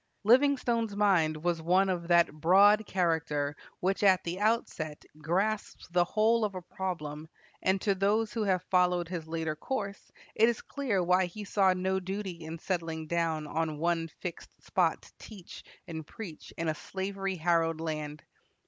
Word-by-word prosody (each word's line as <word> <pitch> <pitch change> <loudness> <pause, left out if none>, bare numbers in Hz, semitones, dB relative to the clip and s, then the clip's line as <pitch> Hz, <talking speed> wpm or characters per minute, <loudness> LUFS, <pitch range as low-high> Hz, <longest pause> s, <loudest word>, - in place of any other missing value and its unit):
Livingstone's 240 -2 +3
mind 165 -7 +2
was 175 -2 0
one 185 +4 +3
of 175 -3 -2
that 170 -1 +4
broad 200 +7 +5
character 160 -5 0 0.3
which 190 +2 0
at 190 -3 +5
the 175 +2 -4
outset 205 -8 -1
grasps 195 +7 -1
the 175 0 +3
whole 220 +5 +2
of 205 -2 -1
a 185 - -4
problem, 160 -5 -5 0.3
and 190 +1 +2
to 200 +1 +1
those 210 +3 +1
who 230 - -2
have 190 -3 +1
followed 180 -2 +2
his 170 -3 -5
later 160 -1 -2
course 200 +1 -5 0.2
it 225 +2 +5
is 235 - -2
clear 235 -10 -1
why 180 +1 +3
he 205 +4 -8
saw 195 -1 +3
no 190 +1 0
duty 190 -2 -5
in 160 +1 -6
settling 165 -2 -3
down 165 -1 -1
on 155 0 -2
one 165 +1 0
fixed 180 - -8
spot - - +1
to - - -17
teach 200 -6 -11 0.2
and 160 -2 -6
preach 195 -9 -9
in 165 - -2
a 155 - +1
slavery 195 +3 -4
harrowed 165 -1 +1
land. 155 -2 -4
180 Hz, 165 wpm, -30 LUFS, 165-200 Hz, 0.3 s, broad